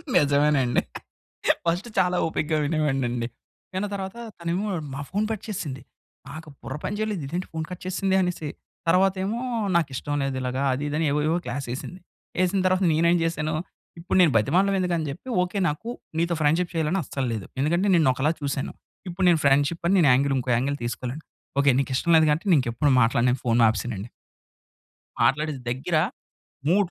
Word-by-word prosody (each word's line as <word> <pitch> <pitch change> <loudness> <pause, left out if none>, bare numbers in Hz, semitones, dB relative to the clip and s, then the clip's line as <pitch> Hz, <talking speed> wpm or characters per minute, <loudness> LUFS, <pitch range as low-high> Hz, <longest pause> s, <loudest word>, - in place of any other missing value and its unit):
నిజమేనండి, 145 -4 +3 0.8
ఫస్టు 175 +7 0
చాలా 180 -1 +3
ఓపికగా 160 -1 -1
వినేవాడినండి. 135 -6 0 0.5
విన్న 190 +3 -1
తర్వాత 190 0 -4 0.2
తనేమో 175 +5 -2 0.3
నా 140 - -4
ఫోన్ 205 +2 0
కట్ 220 - -4
చేసింది. 150 -11 -4 0.5
నాకు 155 +2 -9
బుర్ర 130 - -6
పని 205 - -2
చేయలేదు 210 -7 -2
"ఇదేంటి 175 +5 -3
ఫోన్ 160 -1 -2
కట్ 180 -1 -8
చేసింది" 190 +1 0
అనేసి. 175 -4 -2 0.4
తర్వాత 185 +2 +4
ఏమో 220 +4 -2 0.4
"నాకిష్టం 145 -3 0
లేదు 135 -1 -2
ఇలాగా 130 +1 -2
అది 135 +3 -3
ఇది" 145 - -3
అని 165 - +1
ఏవో 150 +1 +1
ఏవో 165 +2 +2
క్లాస్ 140 -2 -4
ఎసింది. 180 +8 -7 0.4
ఎసిన 190 +2 +1
తర్వాత 185 +1 +2
నేను 165 +2 +3
ఏం 175 - +4
చేశాను, 160 -1 -1 0.5
ఇప్పుడు 175 - 0
నేను 170 -5 +5
బ్రతిమాలడం 185 - +3
ఎందుకు 180 -2 0
అని 155 -2 -2
చెప్పి, 170 - -11 0.2
"ఓకె 180 +3 -4
నాకు 150 +10 -5 0.3
నీతో 170 0 +1
ఫ్రెండ్‌షిప్ 165 +4 +2
చేయాలి 160 -2 0
అని 195 - +1
అస్సలు 135 -1 -3
లేదు. 110 -4 -5
ఎందుకంటే 170 +7 +1
నిన్ను 160 -5 +4
ఒకలా 135 +4 +1
చూసాను. 140 -1 -2 0.4
ఇప్పుడు 180 +2 -1
నేను 165 -3 +3
ఫ్రెండ్‌షిప్ 140 +4 +3
అని 195 - +3
నేను 150 - +5
యాంగిల్ 135 +2 +2
ఇంకో 125 0 -2
యాంగిల్ 140 +4 -1
తీసుకోలేను. 125 +5 -4 0.4
ఓకే 140 0 +5
నీకు 135 0 -1
ఇష్టం 170 - 0
లేదు 160 -1 +4
కాబట్టి 160 +7 -1
నేను 165 - +6
ఇంకెప్పుడు 130 +3 +1
మాట్లాడను" 120 +2 +2
అని 130 - -3
ఫోన్ 120 0 +3
ఆపేసానండి. 110 -1 -3 1.1
మాట్లాడేసి 150 -1 +1
దగ్గర 135 +7 -1 0.7
3 190 +1 +3
155 Hz, 175 wpm, -25 LUFS, 135-180 Hz, 1.1 s, నేను